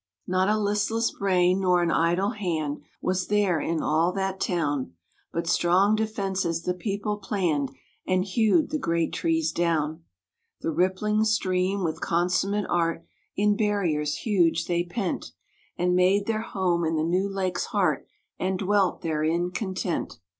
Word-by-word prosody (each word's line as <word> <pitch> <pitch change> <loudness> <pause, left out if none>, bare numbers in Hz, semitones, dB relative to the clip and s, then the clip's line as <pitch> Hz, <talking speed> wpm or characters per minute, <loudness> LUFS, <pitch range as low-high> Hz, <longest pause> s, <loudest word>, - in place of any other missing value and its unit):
Not 185 +2 +1
a 215 - +3
listless 210 +2 0
brain 185 -1 +2
nor 180 -2 +3
an 170 - +1
idle 175 +6 +2
hand 160 -9 -2 0.2
Was 185 0 0
there 200 -5 +2
in 165 +1 -1
all 160 +3 +2
that 195 -1 -2
town, 145 - -1 0.4
But 170 0 -2
strong 180 +4 +3
defences 195 -6 -1
the 180 - 0
people 205 +2 -3
planned, 170 -9 -1 0.4
And 185 0 +2
hewed 220 - +2
the 305 - -1
great 170 - 0
trees 325 -1 0
down. 160 -1 0 0.6
The - - -1
rippling 190 +5 +1
stream, 195 -3 +1
with 160 -2 -2
consummate 185 +4 +1
art, 165 -1 0 0.3
In 205 0 +3
barriers 175 -9 0
huge 170 -6 +1
they 175 -1 0
pent, 180 +1 -4 0.4
And 180 0 +1
made 190 +3 +3
their 220 0 -1
home 185 -6 0
in 165 0 0
the 155 - +1
new 180 +4 +1
lake's 190 -2 -2
heart, - - 0 0.3
And 185 0 0
dwelt 195 -1 +1
therein 165 +2 0
content. 185 -3 -3
185 Hz, 145 wpm, -26 LUFS, 170-205 Hz, 0.6 s, a